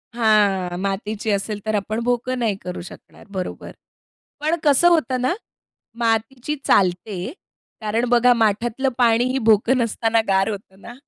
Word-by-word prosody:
हां, 200 -6 +2
मातीची 205 +2 -3
असेल 205 +1 -2
तर 215 0 0
आपण 215 +3 -2
भोकं 245 +1 -1
नाही 220 -4 0
करू 180 -1 -6
शकणार 175 - -13
बरोबर. 185 -2 -6 0.7
पण 310 +3 +1
कसं 295 +4 +5
होतं 260 -7 +1
ना, 255 +7 +1 0.7
मातीची 235 +5 -1
चालते 185 +3 +1 0.5
कारण 220 +3 0
बघा 245 0 +5
माठातलं 230 +4 0
पाणीही 245 +2 +3
भोकं 225 +5 +4
नसताना 230 -1 +1
गार 195 +2 +2
होतं 195 -2 -8
ना. 240 - -10
225 Hz, 135 wpm, -21 LUFS, 200-245 Hz, 0.7 s, कसं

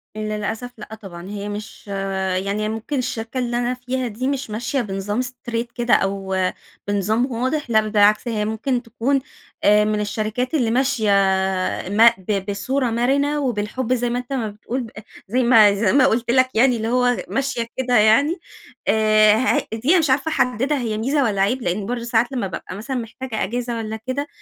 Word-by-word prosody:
للأسف 215 +3 -4
لأ 215 0 -9
طبعًا. 185 -4 -10
هي 205 0 -5
مش 210 +1 -8 0.6
يعني 205 +2 -1
هي 215 - -1
ممكن 225 +6 -3
الشركة 240 -1 -3
اللي 240 -1 -1
أنا 245 +1 0
فيها 255 0 -3
دي، 235 +4 -3
مش 275 -3 -2
ماشية 230 +5 -2
بنظام 205 +1 -2
straight 240 -2 -4
كده 240 0 +1
أو 195 -1 +1 0.5
بنظام 215 +6 0
واضح، 260 +4 -2
لا 220 -1 +4
بالعكس، 210 +2 +3
هي 215 -3 -1
ممكن 230 +4 -1
تكون 255 +4 0 0.4
آآ 210 +1 +5
مِن 210 0 0
الشركات 215 +5 -2
اللي 245 -8 +1
ماشية 255 -3 +1 0.8
ما 225 +4 +6
ب 195 +1 -2
بصورة 255 +6 -1
مرنة 275 +6 +1
وبالحب 245 -1 -1
زي 245 -1 0
ما 245 +1 -1
أنت 250 +2 -6
ما 245 -5 -1
بتقول، 220 +5 -5
ب 230 - -9 0.4
زي 250 +6 +1
ما 225 -4 +6
زي 200 -1 +1
ما 270 -2 +5
قلت 235 -2 +1
لك 255 +1 +4
يعني 245 +2 +4
اللي 220 0 -3
هو 245 +1 +2
ماشية 270 -4 -2
كده 250 -1 +2
يعني. 225 - +4 0.5
آآ 215 -1 +5
ه 255 +4 +2
هي - - -2
دي 315 +11 +4
مش 310 -3 +1
عارفة 275 +4 +2
أحددها 265 +1 +1
هي 225 -4 -2
ميزة 275 +6 +1
والّا 205 -5 0
عيب، 245 +7 +1
لأن 195 0 -2
برضو 240 +2 -3
ساعات 235 +1 +1
لما 245 -7 -2
بابقى 185 0 -7
مثلًا 230 +7 -5
محتاجة 235 0 -4
إجازة 240 +2 -3
والّا 220 -1 -4
كده، 280 +3 -2
235 Hz, 185 wpm, -21 LUFS, 215-255 Hz, 0.8 s, ما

